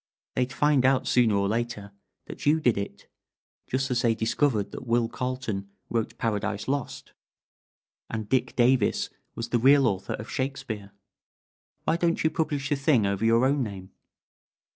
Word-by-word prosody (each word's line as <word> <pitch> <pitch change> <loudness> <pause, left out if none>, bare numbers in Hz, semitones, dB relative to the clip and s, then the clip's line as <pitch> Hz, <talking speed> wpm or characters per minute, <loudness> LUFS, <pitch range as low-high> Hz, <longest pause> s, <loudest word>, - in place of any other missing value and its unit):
"They'd 125 0 0
find 145 -1 +3
out, 130 0 +3
sooner 120 -4 +3
or 100 0 +1
later, 110 -2 -3 0.3
that - - -7
you 155 +2 +5
did 125 -7 +3
it, 100 0 -6 0.6
just 135 +1 -1
as 120 -1 +1
they 115 -3 +2
discovered 115 -1 0
that 130 - -8
Will 115 0 +2
Carleton 120 -6 -4 0.2
wrote 115 -2 -1
'Paradise 105 -2 -2
Lost,' 140 -1 -3 1.0
and 110 -2 -4
Dick 125 +1 0
Davis 120 -2 +2 0.2
was 115 - -4
the 120 - +2
real 135 +3 +6
author 100 -5 -1
of 110 - -6
Shakespeare. 130 -7 -4 0.9
Why 165 - +1
don't 170 -1 +1
you 160 - +2
publish 150 -4 -1
the 145 - +2
thing 135 -5 +3
over 100 +2 -1
your 115 +2 +4
own 140 +1 +2
name?" 95 -5 -6
120 Hz, 160 wpm, -27 LUFS, 110-135 Hz, 1.0 s, real